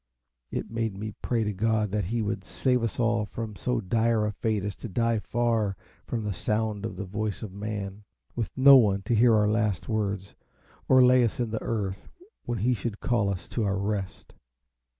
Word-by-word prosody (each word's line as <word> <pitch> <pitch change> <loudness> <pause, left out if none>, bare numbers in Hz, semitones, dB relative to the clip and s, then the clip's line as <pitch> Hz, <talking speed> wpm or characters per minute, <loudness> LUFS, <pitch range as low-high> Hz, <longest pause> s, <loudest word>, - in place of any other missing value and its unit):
It - - -4
made 115 -3 -2
me 105 +1 -5
pray 115 -2 0
to 105 -1 -2
God 110 0 +1
that 105 -2 0
He 115 +4 -1
would 105 +1 -2
save 125 -2 0
us 115 0 -3
all 115 -2 +2
from 110 -1 -6
so 125 +3 -1
dire 110 +2 +1
a 105 - 0
fate 105 0 -1
as 100 -1 -3
to 120 - -7
die 115 +3 +1
far 115 -3 0 0.3
from 115 -2 -2
the 105 -1 -2
sound 105 +2 -1
of 110 - -8
the 100 +2 -5
voice 105 +2 -3
of 100 -4 -7
man, 100 0 -5 0.3
with 115 -4 -2
no 135 +1 +9
one 100 -5 +3
to 110 - -1
hear 115 +1 +5
our 105 -1 +3
last 105 -4 0
words, 100 -3 -2 0.6
or 130 -1 +7
lay 125 0 +6
us 115 - -1
in 120 -3 -1
the 110 - -2
earth 100 -3 -3 0.4
when 120 - -2
He 120 +5 +2
should 110 -1 -4
call 110 -5 +1
us 95 -3 -4
to 115 - -1
our 100 -1 0
rest. 100 -1 -4
110 Hz, 205 wpm, -27 LUFS, 100-115 Hz, 0.6 s, no